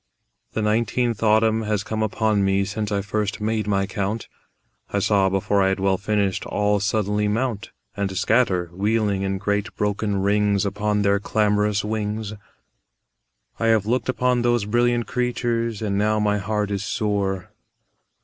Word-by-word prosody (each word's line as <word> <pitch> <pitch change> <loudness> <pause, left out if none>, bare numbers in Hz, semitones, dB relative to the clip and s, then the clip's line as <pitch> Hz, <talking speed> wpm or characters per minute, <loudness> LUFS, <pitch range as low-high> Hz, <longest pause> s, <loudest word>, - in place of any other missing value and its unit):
The 110 - -1
nineteenth 115 +2 0
autumn 110 0 +3
has 105 -2 -1
come 110 0 -3
upon 110 -1 +1
me 95 0 +2
Since 105 +1 -3
I 100 -1 0
first 105 0 -2
made 110 0 -1
my 100 -1 +1
count; 100 +3 -3 0.6
I - - -2
saw, 100 -1 +3
before 95 +1 +1
I 95 - +3
had 95 0 0
well 95 -1 +1
finished, 100 -2 0
All 105 0 +1
suddenly 105 +1 0
mount 110 0 -1 0.3
And 95 -2 -2
scatter 95 -5 +2
wheeling 105 +1 0
in 95 0 -1
great 100 +1 -2
broken 105 -1 -1
rings 105 0 +2
Upon 105 +1 0
their 100 0 +3
clamorous 105 0 +1
wings. 105 0 -3 1.3
I 115 - +1
have 110 -3 +3
looked 125 +4 0
upon 125 -1 +1
those 120 -3 +1
brilliant 120 +2 +1
creatures, 120 -3 -1
And 100 -2 0
now 105 +1 +2
my 105 -1 +1
heart 105 0 -2
is 100 -1 -2
sore. 100 -3 -2
105 Hz, 155 wpm, -23 LUFS, 100-110 Hz, 1.3 s, autumn